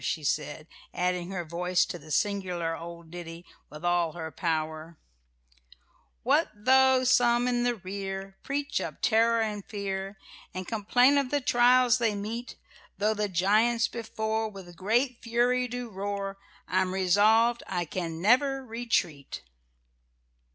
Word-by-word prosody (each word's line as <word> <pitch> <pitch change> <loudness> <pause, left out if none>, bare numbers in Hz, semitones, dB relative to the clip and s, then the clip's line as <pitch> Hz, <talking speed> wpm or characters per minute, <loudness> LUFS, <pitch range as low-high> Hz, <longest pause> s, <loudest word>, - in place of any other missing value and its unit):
she 155 - -2
said, 150 +1 -2 0.3
adding 180 0 -1
her 180 -3 -4
voice 180 +2 +1
to 175 - -6
the 155 +1 -15
singular 180 -3 -1
old 170 -1 -10
ditty 170 0 -8 0.2
with 150 +3 -9
all 175 -2 +1
her 160 -2 -6
power: 160 0 -3 1.3
"What - - +3
though 260 +4 +4
some 245 -1 +3
in 245 -1 +1
the 245 0 +1
rear 195 0 -6
Preach 285 +1 -2
up - - -5
terror 230 0 +3
and 210 -2 -2
fear, 195 -1 -5 0.4
And 185 -1 -5
complain 245 +6 +3
of 275 -2 -2
the 290 - +1
trials 250 -1 +4
they 225 -3 +1
meet, 225 +5 -5 0.4
Tho' 210 +2 +1
the 210 -1 -2
giants 215 +6 +2
before 220 -1 -3
With 190 -4 -11
great 235 +7 0
fury 245 +1 +1
do 245 0 -5
roar, 200 -1 -4 0.3
I'm 185 0 0
resolved 215 +6 +4
I 175 -2 -2
can 165 -1 -4
never 265 +7 +2
retreat." 220 - -2
200 Hz, 135 wpm, -28 LUFS, 175-240 Hz, 1.3 s, though